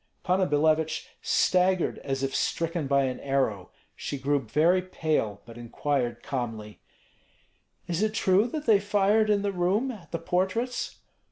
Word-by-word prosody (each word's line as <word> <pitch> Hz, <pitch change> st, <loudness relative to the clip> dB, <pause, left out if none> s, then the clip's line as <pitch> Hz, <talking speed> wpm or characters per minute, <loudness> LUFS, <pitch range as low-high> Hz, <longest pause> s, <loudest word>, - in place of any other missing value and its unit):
Panna 185 Hz, +1 st, +2 dB
Billevich 155 Hz, +2 st, +1 dB
staggered 185 Hz, 0 st, +2 dB
as 135 Hz, 0 st, -3 dB
if 135 Hz, 0 st, -1 dB
stricken 165 Hz, -3 st, -1 dB
by 140 Hz, 0 st, +3 dB
an 130 Hz, -1 st, -2 dB
arrow. 130 Hz, -9 st, -1 dB, 0.3 s
She 140 Hz, -, -5 dB
grew 140 Hz, +2 st, +1 dB
very 155 Hz, +10 st, +2 dB
pale, 155 Hz, -, -2 dB
but 115 Hz, 0 st, -11 dB
inquired 120 Hz, 0 st, -2 dB
calmly, 110 Hz, -5 st, -5 dB, 1.1 s
"Is 175 Hz, +1 st, -2 dB
it 215 Hz, 0 st, 0 dB
true 195 Hz, +3 st, +3 dB
that 300 Hz, +4 st, -5 dB
they 215 Hz, -3 st, +5 dB
fired 205 Hz, +2 st, +2 dB
in 205 Hz, -1 st, +2 dB
the 200 Hz, -, 0 dB
room, 195 Hz, +8 st, 0 dB
at 185 Hz, -10 st, -12 dB
the 165 Hz, -, -1 dB
portraits?" 190 Hz, +9 st, -1 dB
165 Hz, 150 wpm, -27 LUFS, 135-195 Hz, 1.1 s, they